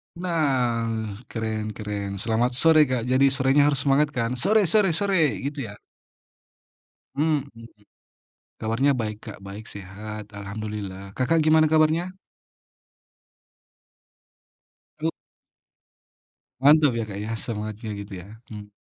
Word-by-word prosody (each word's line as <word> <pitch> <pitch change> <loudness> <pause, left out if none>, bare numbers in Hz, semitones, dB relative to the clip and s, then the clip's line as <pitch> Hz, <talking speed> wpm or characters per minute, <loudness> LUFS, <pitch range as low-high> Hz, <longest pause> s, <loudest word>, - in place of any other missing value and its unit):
Nah, 120 - -1
keren 110 -2 -3
keren. 100 -2 -4
Selamat 120 +2 +1
sore, 155 +3 +5
Kak. 125 -2 -1
Jadi 135 +1 +4
sorenya 140 +1 +4
harus 145 -2 +1
semangat 145 +2 +3
kan? 115 -2 0
Sore 210 - +4
sore 200 -5 +3
sore, 180 -4 +1
gitu 140 -2 -4
ya. 100 - -9 1.4
Mmm. 150 -1 +1 1.1
Kabarnya 115 +6 +2
baik, 105 -2 -3
Kak, 105 - -7
baik, 105 +3 -8
sehat. 105 +2 -8
Alhamdulillah. 100 -1 -6
Kakak 155 +7 +2
gimana 155 0 +5
kabarnya? 160 +4 +2 2.9
E 160 - +2 1.5
Mantap 150 0 +6
ya, 115 - -1
Kak, 100 -1 -6
ya, 105 +2 -4
semangatnya 110 0 -5
gitu 100 0 -8
ya. 95 - -14 0.2
Mmm. 105 -1 -9
120 Hz, 110 wpm, -24 LUFS, 105-150 Hz, 2.9 s, Mantap